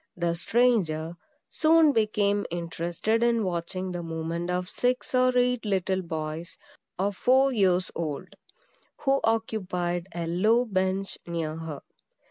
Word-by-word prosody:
(the 170 Hz, -1 st, 0 dB
stranger) 175 Hz, -5 st, +1 dB, 0.3 s
soon 320 Hz, -1 st, +4 dB
became 210 Hz, -3 st, +1 dB
interested 170 Hz, +6 st, -2 dB
in 235 Hz, -1 st, +2 dB
watching 185 Hz, +1 st, -3 dB
the 175 Hz, -1 st, -4 dB
movement 165 Hz, +1 st, -4 dB
of 180 Hz, 0 st, -1 dB
six 250 Hz, +7 st, -1 dB
or 255 Hz, 0 st, +4 dB
eight 250 Hz, -1 st, +2 dB
little 190 Hz, -2 st, 0 dB
boys, 160 Hz, -1 st, -5 dB, 0.4 s
of 195 Hz, +1 st, 0 dB
four 265 Hz, +5 st, +4 dB
years 185 Hz, -4 st, +2 dB
old, 165 Hz, +2 st, -4 dB, 0.7 s
who 275 Hz, -1 st, +2 dB
occupied 185 Hz, -6 st, -1 dB
a 170 Hz, -1 st, -2 dB
low 215 Hz, +9 st, +3 dB
bench 190 Hz, -2 st, -1 dB
near 165 Hz, -2 st, -3 dB
her. 160 Hz, -3 st, -6 dB
185 Hz, 125 wpm, -27 LUFS, 170-225 Hz, 0.7 s, soon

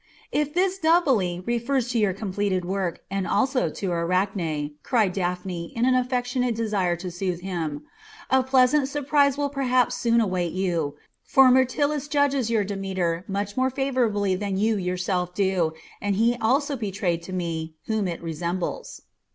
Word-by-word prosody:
"If 295 Hz, +1 st, -1 dB
this 380 Hz, +1 st, +1 dB
'doubly' 260 Hz, -, +2 dB
refers 240 Hz, +1 st, 0 dB
to 235 Hz, -, +1 dB
your 205 Hz, -3 st, +3 dB
completed 195 Hz, -1 st, -2 dB
work, 185 Hz, -2 st, -2 dB
and 195 Hz, -1 st, -1 dB
also 265 Hz, -1 st, +1 dB
to -, -, -6 dB
the 180 Hz, -, 0 dB
Arachne," 170 Hz, -3 st, -1 dB
cried 215 Hz, -7 st, +1 dB
Daphne 180 Hz, -2 st, -3 dB
in 230 Hz, -, 0 dB
the 255 Hz, 0 st, +4 dB
affectionate 250 Hz, -1 st, -1 dB
desire 205 Hz, -6 st, 0 dB
to 180 Hz, +1 st, -6 dB
soothe 180 Hz, 0 st, -3 dB
him, 165 Hz, -6 st, -4 dB, 0.5 s
"a 265 Hz, 0 st, +5 dB
pleasant 265 Hz, +2 st, +3 dB
surprise 285 Hz, -1 st, +2 dB
will 285 Hz, -1 st, -1 dB
perhaps 255 Hz, -3 st, +2 dB
soon 235 Hz, -1 st, +2 dB
await 185 Hz, -6 st, 0 dB
you, 170 Hz, -6 st, -1 dB, 0.3 s
for 270 Hz, -2 st, +6 dB
Myrtilus 280 Hz, +3 st, +2 dB
judges 285 Hz, -5 st, +1 dB
your 225 Hz, -3 st, +2 dB
Demeter 190 Hz, -4 st, -2 dB
much 200 Hz, 0 st, -3 dB
more 260 Hz, 0 st, +2 dB
favourably 245 Hz, -7 st, 0 dB
than 195 Hz, 0 st, -2 dB
you 220 Hz, +2 st, +2 dB
yourself 180 Hz, -1 st, -2 dB
do, 190 Hz, -5 st, +1 dB, 0.3 s
and 205 Hz, -1 st, 0 dB
he 230 Hz, +4 st, +3 dB
also 280 Hz, +6 st, +2 dB
betrayed 195 Hz, -7 st, -2 dB
to 170 Hz, -, -9 dB
me 165 Hz, -3 st, -3 dB
whom 220 Hz, -3 st, 0 dB
it 170 Hz, -1 st, -5 dB
resembles." 170 Hz, +2 st, -4 dB
205 Hz, 160 wpm, -25 LUFS, 180-255 Hz, 0.5 s, for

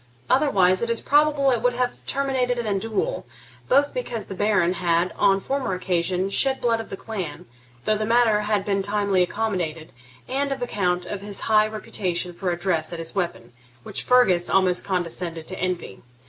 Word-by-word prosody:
Otherwise 195 Hz, -10 st, +4 dB
it 235 Hz, -, -1 dB
is 230 Hz, -1 st, +3 dB
probable 290 Hz, -1 st, +3 dB
it 240 Hz, -3 st, +1 dB
would 245 Hz, +1 st, +2 dB
have 250 Hz, 0 st, -2 dB
terminated 260 Hz, -3 st, 0 dB
in 240 Hz, -, -2 dB
a 200 Hz, -2 st, 0 dB
duel, 225 Hz, -, -2 dB, 0.5 s
both 280 Hz, +2 st, +3 dB
because 240 Hz, -, -4 dB
the -, -, -7 dB
Baron 205 Hz, -3 st, +2 dB
had, 175 Hz, 0 st, 0 dB
on 195 Hz, -, +4 dB
a -, -, -4 dB
former 265 Hz, -2 st, -2 dB
occasion, 180 Hz, 0 st, -1 dB
shed 265 Hz, +5 st, +3 dB
blood 230 Hz, -1 st, +1 dB
of 225 Hz, -, -7 dB
the 195 Hz, -, -6 dB
clan, 190 Hz, -10 st, -6 dB, 0.4 s
though 215 Hz, -1 st, +1 dB
the -, -, 0 dB
matter 230 Hz, -2 st, +4 dB
had 210 Hz, -1 st, 0 dB
been 195 Hz, -1 st, 0 dB
timely 200 Hz, -1 st, +1 dB
accommodated, 175 Hz, -5 st, -2 dB, 0.4 s
and 275 Hz, +2 st, -1 dB
on 265 Hz, -2 st, -2 dB
account 180 Hz, -6 st, -1 dB
of 205 Hz, -, -5 dB
his 205 Hz, -1 st, -4 dB
high 215 Hz, -1 st, +4 dB
reputation 180 Hz, -5 st, -3 dB
for 180 Hz, +1 st, -3 dB
address 175 Hz, -2 st, -1 dB
at 170 Hz, -, -5 dB
his 165 Hz, 0 st, -5 dB
weapon, 175 Hz, -11 st, -3 dB, 0.3 s
which -, -, -5 dB
Fergus 190 Hz, -9 st, +3 dB
almost 185 Hz, -2 st, +3 dB
condescended 170 Hz, -3 st, -3 dB
to 185 Hz, -, -7 dB
envy. 180 Hz, -, -3 dB
200 Hz, 185 wpm, -23 LUFS, 180-240 Hz, 0.5 s, Otherwise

